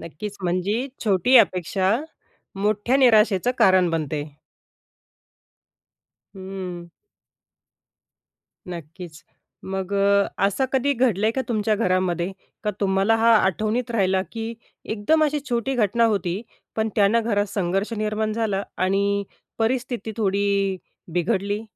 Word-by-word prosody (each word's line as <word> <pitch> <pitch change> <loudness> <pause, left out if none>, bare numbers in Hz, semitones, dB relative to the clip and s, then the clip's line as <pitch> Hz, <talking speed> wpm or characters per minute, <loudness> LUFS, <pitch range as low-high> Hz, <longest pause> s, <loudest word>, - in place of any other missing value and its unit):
नक्कीच. 200 +6 -7
म्हणजे 190 +8 -1 0.2
छोटी 210 +6 +4
अपेक्षा 185 -2 +2 0.7
मोठ्या 215 +5 +1
निराशेचं 225 -5 +4
कारण 185 -2 +4
बनते. 155 -2 -2 2.1
हं. 185 -2 -7 1.8
नक्कीच. 165 -1 -9 0.4
मग 190 0 -4
अ, 200 0 +3 0.2
असं 200 +7 +1
कधी 275 +2 +2
घडलंय 225 -4 +2
का 265 - -1
तुमच्या 215 -2 +1
घरामध्ये, 185 -3 0 0.3
का 210 - 0
तुम्हाला 195 +2 +2
हा 230 +1 +5
आठवणीत 215 +6 0
राहिला 190 -4 +2
की 225 0 -5 0.3
एकदम 230 +9 +1
अशी 300 0 +1
छोटी 240 +3 -1
घटना 230 0 +2
होती. 195 -3 -1 0.3
पण 220 0 0
त्यानं 210 +3 +3
घरात 205 -3 0
संघर्ष 195 +2 -1
निर्माण 215 0 -1
झाला 210 -3 -1
आणि 200 +2 +1 0.4
परिस्थिती 240 0 -1
थोडी 200 -1 +1 0.4
बिघडली? 200 +4 0
200 Hz, 110 wpm, -23 LUFS, 190-225 Hz, 2.1 s, हा